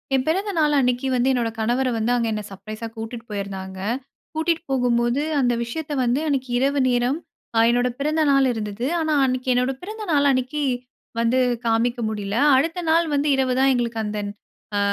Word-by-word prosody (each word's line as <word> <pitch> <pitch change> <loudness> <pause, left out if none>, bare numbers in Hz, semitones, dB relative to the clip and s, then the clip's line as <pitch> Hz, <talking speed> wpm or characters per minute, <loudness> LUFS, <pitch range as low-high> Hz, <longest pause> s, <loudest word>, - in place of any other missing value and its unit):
என் 260 0 +1
பிறந்த 385 +6 0
நாள் 300 -2 +3
அன்னைக்கி 250 0 +1
வந்து 250 0 +2
என்னோட 240 -2 0
கணவர 240 +4 +1
வந்து 225 +1 0
அங்க 235 -1 0
என்னை 210 -1 -3
சர்ப்ரைஸா 215 +3 -7
கூட்டிட்டு 225 +1 -6
போயிருந்தாங்க. 190 -2 -5 0.5
கூட்டிட்டு 325 +1 0
போகும்போது 245 0 +2 0.2
அந்த 245 -2 +2
விஷயத்த 300 +6 -5
வந்து 245 +3 +1
அன்னைக்கி 270 -3 -1
இரவு 280 +2 +1
நேரம், 245 +4 +1 0.4
அ - - +6
என்னோட 245 +1 +2
பிறந்த 305 +3 +1
நாள் 275 -1 +4
இருந்தது. 220 +2 -3
ஆனா 315 -1 0
அன்னைக்கி 255 0 -1
என்னோட 250 +2 +1
பிறந்த 430 +3 -6
நாள் 285 -1 +4
அன்னைக்கி 260 +3 -1 0.6
வந்து 235 +3 +2 0.3
காமிக்க 235 +2 +1
முடியல. 205 -1 -3 0.2
அடுத்த 330 +6 0
நாள் 335 +1 +4
வந்து 285 +1 +1
இரவு 260 -1 +1
தான் 270 0 +5
எங்களுக்கு 235 -2 -1
அந்த 210 0 -3 0.6
அ - - +2
250 Hz, 175 wpm, -23 LUFS, 230-280 Hz, 0.6 s, அ